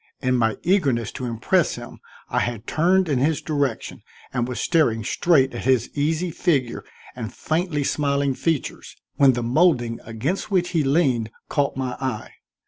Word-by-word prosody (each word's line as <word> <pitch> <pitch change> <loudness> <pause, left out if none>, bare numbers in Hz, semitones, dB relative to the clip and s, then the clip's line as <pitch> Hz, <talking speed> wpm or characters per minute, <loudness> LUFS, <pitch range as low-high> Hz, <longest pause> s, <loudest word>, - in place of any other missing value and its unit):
In 130 -1 +1
my 115 -3 +1
eagerness 140 - +1
to 130 - -6
impress 125 +9 +1
him 120 0 -10 0.3
I - - 0
had 120 -1 -3
turned 185 +3 +2
in 140 -5 +1
his 150 +3 +1
direction, 145 -7 -2 0.3
and 120 -2 0
was 125 - -4
staring 130 -10 +2
straight 135 -1 +2
at 120 - -6
his 130 -2 +2
easy 160 +4 0
figure 140 -8 0 0.3
and 115 -3 -5
faintly 160 -2 -1
smiling 140 -1 0
features, 160 +1 -3 0.2
when 135 -2 +6
the 120 0 -2
molding 120 -3 +2
against 120 - -3
which 180 -3 +1
he 165 -4 +1
leaned 135 -6 +1 0.2
caught 140 -3 0
my 130 -1 -2
eye. 130 -5 -4
135 Hz, 160 wpm, -23 LUFS, 120-160 Hz, 0.3 s, when